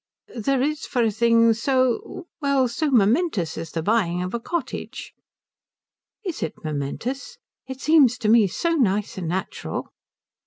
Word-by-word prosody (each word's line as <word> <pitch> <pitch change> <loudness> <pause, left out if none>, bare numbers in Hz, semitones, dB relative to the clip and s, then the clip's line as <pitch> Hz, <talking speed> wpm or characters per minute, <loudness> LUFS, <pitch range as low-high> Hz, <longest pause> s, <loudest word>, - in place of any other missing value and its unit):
"There 255 +3 0
is 305 +1 -2
for 245 -3 +1
a 225 - +2
thing 230 +1 +4
so 255 +8 0 0.2
well, 280 -3 +2
so 290 +6 -1
momentous 225 - +2
as 165 0 -6
the 165 +1 -4
buying 180 -4 +1
of 185 - -5
a 235 - -1
cottage." 310 +2 -5 1.1
"Is 355 -4 -4
it 160 - -3
momentous? 160 - -4 0.3
It 265 0 -7
seems 285 -6 +5
to 215 - -2
me 220 -1 +6
so 335 - -1
nice 210 - 0
and 175 - -4
natural." 185 +3 -4
235 Hz, 150 wpm, -23 LUFS, 195-275 Hz, 1.1 s, me